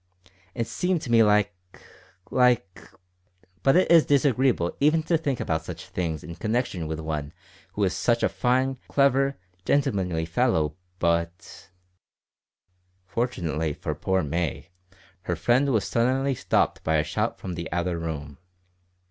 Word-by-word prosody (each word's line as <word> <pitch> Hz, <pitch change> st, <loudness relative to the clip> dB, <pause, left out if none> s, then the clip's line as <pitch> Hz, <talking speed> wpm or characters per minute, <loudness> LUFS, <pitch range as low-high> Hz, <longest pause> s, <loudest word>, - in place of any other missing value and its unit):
It 115 Hz, -2 st, -1 dB
seemed 180 Hz, +8 st, -1 dB
to 120 Hz, -, -4 dB
me 115 Hz, -1 st, +6 dB
like 105 Hz, -1 st, +3 dB, 0.8 s
like 120 Hz, -6 st, +1 dB, 0.7 s
but 135 Hz, -, +4 dB
it 185 Hz, -, +3 dB
is 165 Hz, -2 st, +8 dB
disagreeable 130 Hz, -, +2 dB
even 155 Hz, +3 st, +3 dB
to 165 Hz, -, +1 dB
think 145 Hz, -6 st, -1 dB
about 80 Hz, -1 st, -1 dB
such -, -, -8 dB
things 80 Hz, -4 st, -3 dB
in 85 Hz, -, -7 dB
connection 110 Hz, -7 st, -1 dB
with 80 Hz, 0 st, -4 dB
one 75 Hz, -1 st, -4 dB, 0.4 s
who 105 Hz, -, -1 dB
is 95 Hz, -2 st, +1 dB
such 120 Hz, -1 st, +1 dB
a -, -, +5 dB
fine, 130 Hz, +1 st, 0 dB
clever, 140 Hz, 0 st, +2 dB, 0.3 s
gentlemanly 90 Hz, -, 0 dB
fellow 80 Hz, -, +1 dB, 0.2 s
but 85 Hz, +1 st, -2 dB, 0.6 s
" 90 Hz, 0 st, -46 dB
Fortunately 80 Hz, -, -1 dB
for 75 Hz, -, -4 dB
poor 95 Hz, +5 st, 0 dB
May, 80 Hz, 0 st, -3 dB, 0.6 s
her 90 Hz, -, +1 dB
friend 120 Hz, -, +2 dB
was 110 Hz, -7 st, +1 dB
suddenly 130 Hz, +3 st, +1 dB
stopped 125 Hz, -, 0 dB
by 80 Hz, -, +1 dB
a 75 Hz, -, +3 dB
shout -, -, -2 dB
from 90 Hz, -, -6 dB
the 85 Hz, 0 st, -6 dB
outer 85 Hz, 0 st, -1 dB
room. 75 Hz, -4 st, -6 dB
95 Hz, 145 wpm, -25 LUFS, 85-130 Hz, 0.8 s, is